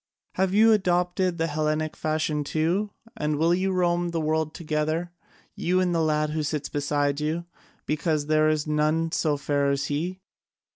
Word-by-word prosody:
Have 190 0 +1
you 220 +3 +5
adopted 180 -2 +1
the 165 - +1
Hellenic 155 0 -1
fashion 155 -1 -1
too? 165 +8 0 0.3
And 150 -5 -1
will 165 +3 +3
you 190 +2 +1
roam 175 -1 +1
the 170 -1 -2
world 155 0 -1
together, 155 +2 -2 0.4
you 180 +2 0
and 180 -1 +1
the 165 - +1
lad 155 -1 +1
who 155 0 -1
sits 150 -1 -3
beside 145 0 0
you, 160 +3 -2 0.4
because 155 -1 0
there 155 0 +3
is 155 -1 0
none 155 +2 +1
so 150 -3 +1
fair 140 0 0
as 140 0 0
he?" 175 +6 -2
155 Hz, 165 wpm, -25 LUFS, 150-175 Hz, 0.4 s, you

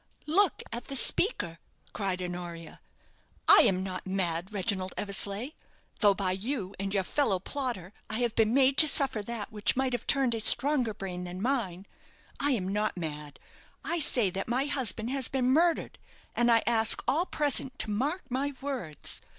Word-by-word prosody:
"Look 365 +3 +2
at 235 - -6
the 275 - -6
speaker," 175 - +1 0.3
cried 190 -3 -3
Honoria. 175 -2 -8 0.7
"I - - +8
am 185 0 0
not 185 0 -6
mad, 185 -1 -2
Reginald 190 -2 -2
Eversleigh, 200 +4 -1 0.5
though, 205 -2 +4
by 190 -1 -1
you 195 0 -4
and 195 0 -4
your 195 -1 0
fellow 220 -2 0
plotter, 210 -4 -6 0.2
I 215 - -1
have 240 -2 0
been 220 -1 +1
made 265 +1 +3
to 315 - +8
suffer 275 -6 +3
that 215 -1 -5
which 210 -1 0
might 260 -1 -1
have 245 - -5
turned 270 -4 +2
a 225 - -3
stronger 245 0 +3
brain 180 -2 -6
than 180 +1 -8
mine. 200 -6 -2 0.5
I 285 - +1
am 190 -7 -2
not 210 +1 -2
mad. 150 -3 -7 0.5
I 340 - 0
say 240 - +7
that 195 +2 -4
my 250 +4 0
husband 250 -5 +1
has 270 -3 +2
been 255 -1 -1
murdered; 330 +4 0 0.4
and 240 0 +2
I 230 -1 +4
ask 225 -1 +3
all 335 +6 +1
present 275 -3 +1
to 215 - -3
mark 285 - -2
my 275 +2 -3
words. 255 - -5
220 Hz, 175 wpm, -28 LUFS, 190-270 Hz, 0.7 s, I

